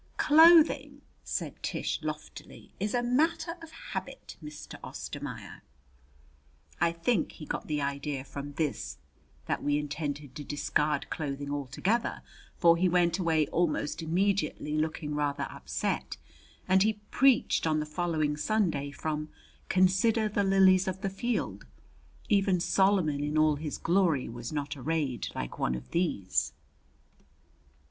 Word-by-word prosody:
"Clothing," 320 +1 +6 0.2
said - - -4
Tish - - -2
loftily, - - -7
"is 205 +4 -1
a 245 - +1
matter 325 +7 +1
of 330 - -10
habit, 325 - -7
Mr. 150 0 -9
Ostermaier." - - -7 1.2
I 170 0 +3
think 170 +3 0
he 155 - -9
got - - -4
the 150 -2 -1
idea 140 -1 -3
from 140 +1 -7
this 135 - -2 0.5
that - - -1
we 145 0 +1
intended 150 -2 -4
to 145 - -7
discard 145 0 -1
clothing 145 -2 -3
altogether, 145 - -1 0.3
for 170 -1 +5
he 180 +1 +3
went 175 +1 +2
away 160 -4 +2
almost 165 -2 0
immediately, 180 -2 0
looking 155 -1 -2
rather 145 -1 -1
upset, 70 +1 -3 0.5
and 190 0 +4
he 215 +2 +4 0.2
preached 265 -9 +3
on 155 -1 +2
the 150 - -2
following 155 -1 -1
Sunday 155 -3 0
from 150 +1 -4 0.4
"Consider 190 +4 +3
the 205 -1 0
lilies 190 -1 +5
of 190 +1 -3
the 195 - -2
field.... 195 - -2 0.6
Even 195 -3 +3
Solomon 175 -4 +2
in 150 +1 -1
all 155 -1 +4
his 150 0 -4
glory 170 -6 +2
was 120 0 -6
not 145 -1 -3
arrayed 140 -2 -2
like - - -5
one 60 - 0
of 60 - -9
these." 160 - 0
160 Hz, 135 wpm, -29 LUFS, 145-190 Hz, 1.2 s, Clothing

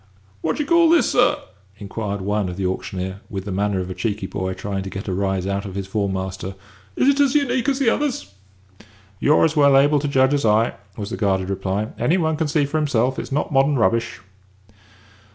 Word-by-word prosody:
"What 160 - -1
do 295 - 0
you - - -10
call 335 -1 +5
this, 325 -7 +4
sir?" 245 - +3 0.4
inquired 100 0 -4
one 105 0 -1
of 90 - -7
the 95 - -2
auctioneer, 95 +1 -4
with 95 -2 -5
the 100 - -4
manner 100 0 0
of 90 0 -5
a - - -3
cheeky 105 -1 -3
boy 95 -1 -3
trying 95 +1 -4
to 95 - -6
get 95 +2 -7
a 95 - -1
rise 95 -1 -1
out 100 0 -2
of 95 -2 -8
his 100 -1 -3
form 100 0 -1
master. 95 0 -5 0.4
"Is - - +2
it 280 0 +3
as 280 -1 +3
'unique' 260 -3 +1
as 270 - 0
the 265 -5 +3
others?" 250 - -2 0.9
"You're 150 +3 +4
as 160 0 0
well 140 -2 +5
able 145 +2 +4
to 145 - -2
judge 130 0 +3
as 145 - +1
I 110 +1 +3
am," - - -10 0.2
was 105 0 -5
the - - -3
guarded 95 -3 0
reply. 95 +3 -2
"Any 175 - +2
one 160 -3 0
can 160 0 -1
see 145 0 +1
for 145 +3 -2
himself 130 -3 0
it's - - -6
not 150 +2 -1
modern 135 +1 +3
rubbish." 115 -5 0
110 Hz, 225 wpm, -21 LUFS, 95-150 Hz, 0.9 s, call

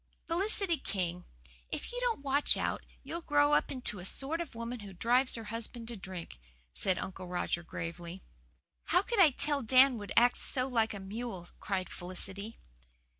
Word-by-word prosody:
"Felicity 370 0 +1
King, 180 -2 -3 0.4
if - - -5
you - - -3
don't 470 - 0
watch 280 +1 +3
out - - -1 0.2
you'll 335 - -5
grow 290 -2 +3
up - - +3
into 255 -6 +1
the 180 - -8
sort 290 - +2
of 325 -8 -7
woman 235 +1 -5
who 200 -2 -9
drives 245 +8 +2
her 230 - -5
husband 230 0 -6
to 235 - -4
drink," 185 - -8 0.3
said 185 - +1
Uncle 185 -1 -6
Roger 175 -1 -1
gravely. 170 +2 -6 0.6
"How 360 +3 +3
could 470 0 -1
I 350 -5 +9
tell 290 +1 +2
Dan 255 +1 +5
would 205 - -8
act 245 +1 +6
so 255 0 +3
like 225 -4 +1
a - - -6
mule!" 195 -2 -6
cried 190 -2 -2
Felicity. 195 +4 -5
230 Hz, 175 wpm, -32 LUFS, 190-285 Hz, 0.6 s, I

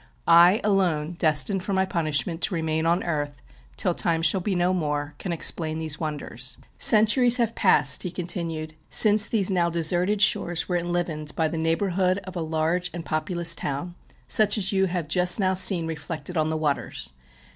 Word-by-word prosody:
I, 175 +5 +6
alone, 175 -6 0
(destined 155 +4 +2
for 200 - -3
my 190 0 +1
punishment 165 -1 -2
to 180 - -1
remain 160 0 -1
on 170 +2 +1
earth 145 -4 -4 0.4
'till - - +1
time 165 -1 0
shall 170 +4 +2
be 190 +1 -2
no 175 +1 +1
wore,') 150 -4 -3
can 185 - -5
explain 160 -1 0
these 155 -1 -3
wonders. 155 -2 -3 0.2
Centuries 235 +3 +4
have 230 -2 0
passed," 140 -2 +3
he 180 - -2
continued, 165 -3 -5 0.2
"since 215 0 +4
these 205 -4 0
now 175 -2 +1
deserted 175 +4 0
shores 175 -3 +1
were 180 - -2
enlivened 170 -3 -3
by 160 - 0
the 160 - -5
neighbourhood 180 +3 0
of 185 -1 -10
a 175 - -3
large 160 +3 -1
and 170 -2 -7
po 155 +1 -1
pulous 170 +1 0
town, 145 +5 -5 0.3
such 215 0 +4
as 195 -2 0
you 190 -1 +1
have 175 -3 -4
just 180 +4 +4
now 190 -1 +1
seen 185 -2 +4
reflected 160 +2 -6
on 155 -1 0
the 160 - -2
waters. 145 - -3
170 Hz, 180 wpm, -24 LUFS, 155-185 Hz, 0.4 s, I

